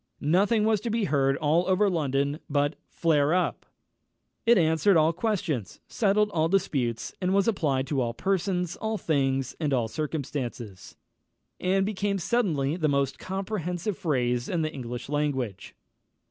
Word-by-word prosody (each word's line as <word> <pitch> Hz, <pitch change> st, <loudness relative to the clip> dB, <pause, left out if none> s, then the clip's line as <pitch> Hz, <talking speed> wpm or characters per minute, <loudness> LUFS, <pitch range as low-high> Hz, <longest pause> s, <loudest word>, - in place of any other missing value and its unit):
Nothing 210 Hz, +4 st, +3 dB
was 215 Hz, -2 st, +2 dB
to 235 Hz, -, -3 dB
be 225 Hz, 0 st, 0 dB
heard 140 Hz, -5 st, +2 dB
all 160 Hz, +3 st, +2 dB
over 190 Hz, +2 st, +3 dB
London 145 Hz, -4 st, 0 dB
but 145 Hz, +1 st, +1 dB
"flare 155 Hz, -1 st, +2 dB
up!" 185 Hz, -, -1 dB, 0.8 s
It 235 Hz, 0 st, +7 dB
answered 165 Hz, +3 st, +4 dB
all 160 Hz, +1 st, +4 dB
questions, 170 Hz, -, -2 dB
settled 210 Hz, 0 st, +2 dB
all 160 Hz, -3 st, +1 dB
disputes, 130 Hz, -11 st, -1 dB
was 190 Hz, +2 st, +2 dB
applied 145 Hz, -11 st, +1 dB
to 135 Hz, -2 st, -1 dB
all 120 Hz, -1 st, -2 dB
persons, 185 Hz, -2 st, -1 dB
all 220 Hz, 0 st, -2 dB
things, 135 Hz, -, 0 dB
and 150 Hz, -3 st, -1 dB
all 120 Hz, -3 st, 0 dB
circumstances, 130 Hz, -, -5 dB, 0.6 s
and 190 Hz, +1 st, +1 dB
became 200 Hz, -1 st, -1 dB
suddenly 165 Hz, -, 0 dB
the 155 Hz, -4 st, +1 dB
most 140 Hz, -1 st, 0 dB
comprehensive 190 Hz, -1 st, -3 dB
phrase 125 Hz, -9 st, -1 dB
in 170 Hz, -3 st, 0 dB
the 155 Hz, 0 st, -2 dB
English 120 Hz, -2 st, -6 dB
language. 135 Hz, -8 st, -2 dB
160 Hz, 145 wpm, -27 LUFS, 140-195 Hz, 0.8 s, It